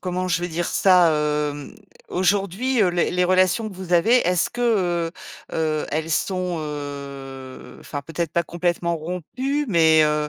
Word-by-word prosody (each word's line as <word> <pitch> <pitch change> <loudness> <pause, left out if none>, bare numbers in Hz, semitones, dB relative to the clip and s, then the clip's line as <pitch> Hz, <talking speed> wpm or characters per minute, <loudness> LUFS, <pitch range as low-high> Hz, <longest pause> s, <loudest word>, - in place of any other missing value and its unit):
comment 185 0 -2
je 175 0 0
vais 175 - -2
dire 170 +1 -2
ça, 180 -3 +4 0.4
hem? 145 -1 -9 0.3
Aujourd'hui, 200 +6 0
heu, 190 - +4
les 175 0 0
les 180 0 +1
relations 185 +4 +2
que 195 - -11
vous 180 -1 -2
avez, 225 +9 +5
est-ce 180 -1 +1
que, 245 - -7 0.5
heu, - - -9 0.5
heu, 155 -1 -1
elles 160 +2 -2
sont, 180 0 -1
heu, 140 -3 -8
enfin 145 -1 -6
peut-être 165 +1 -4
pas 170 - +2
complètement 170 0 -1
rompues 180 - -3
mais, 160 -4 +5
heu, 150 0 0
175 Hz, 165 wpm, -22 LUFS, 155-185 Hz, 0.5 s, avez